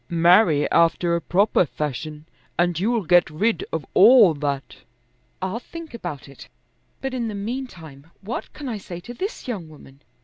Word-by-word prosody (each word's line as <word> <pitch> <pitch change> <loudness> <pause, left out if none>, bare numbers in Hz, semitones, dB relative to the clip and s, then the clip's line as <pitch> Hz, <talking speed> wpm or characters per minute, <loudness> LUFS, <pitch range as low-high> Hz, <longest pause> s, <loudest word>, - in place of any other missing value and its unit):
"Marry 170 -2 +4
after 170 +1 +3
a 170 - -1
proper 195 +3 +2
fashion, 150 0 -5 0.3
and 175 -1 +1
you'll 225 +3 0
get 175 +1 +4
rid 215 - 0
of - - -3
all 230 -9 +7
that." 140 -2 -4 0.7
"I'll 190 +5 -2
think 330 +3 -10
about 175 - -7
it, 140 - -13 0.5
but 270 -1 -3
in 240 -3 -2
the 215 - -5
meantime 200 - -7
what 215 +5 -5
can 290 - -8
I 225 -4 -4
say 175 -3 -8
to 240 - -9
this 390 - -5
young 195 -10 -5
woman? 140 -2 -16
175 Hz, 165 wpm, -23 LUFS, 155-230 Hz, 0.7 s, all